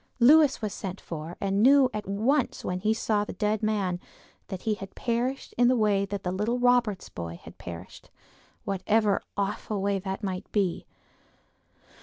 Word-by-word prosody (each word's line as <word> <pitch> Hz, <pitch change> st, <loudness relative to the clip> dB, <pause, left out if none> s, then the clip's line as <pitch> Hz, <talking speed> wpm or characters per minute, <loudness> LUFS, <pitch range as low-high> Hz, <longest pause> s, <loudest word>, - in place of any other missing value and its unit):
Lewis 285 Hz, 0 st, +6 dB
was 210 Hz, -1 st, -2 dB
sent 195 Hz, -2 st, -5 dB
for, 165 Hz, +1 st, -7 dB
and 195 Hz, +1 st, 0 dB
knew, 270 Hz, +2 st, +7 dB
at 210 Hz, -2 st, -4 dB
once 230 Hz, +8 st, 0 dB
when 180 Hz, 0 st, -2 dB
he 210 Hz, +3 st, +1 dB
saw 220 Hz, -2 st, +1 dB
the -, -, -6 dB
dead 210 Hz, +2 st, 0 dB
man 200 Hz, -5 st, 0 dB, 0.5 s
that 190 Hz, -1 st, -6 dB
he 220 Hz, -, +1 dB
had 195 Hz, -2 st, -8 dB
perished 245 Hz, +3 st, -2 dB
in 245 Hz, -, +6 dB
the 255 Hz, -, +4 dB
way 205 Hz, -3 st, +2 dB
that 200 Hz, 0 st, -5 dB
the 180 Hz, -, -1 dB
little 210 Hz, +6 st, 0 dB
Roberts 245 Hz, -5 st, +2 dB
boy 85 Hz, -1 st, -6 dB
had -, -, -13 dB
perished—whatever 195 Hz, -, -3 dB
that -, -, -34 dB
awful 205 Hz, +1 st, -2 dB
way 195 Hz, 0 st, 0 dB, 0.2 s
might 185 Hz, -2 st, -4 dB
be. 195 Hz, -5 st, 0 dB
205 Hz, 165 wpm, -27 LUFS, 190-230 Hz, 0.5 s, knew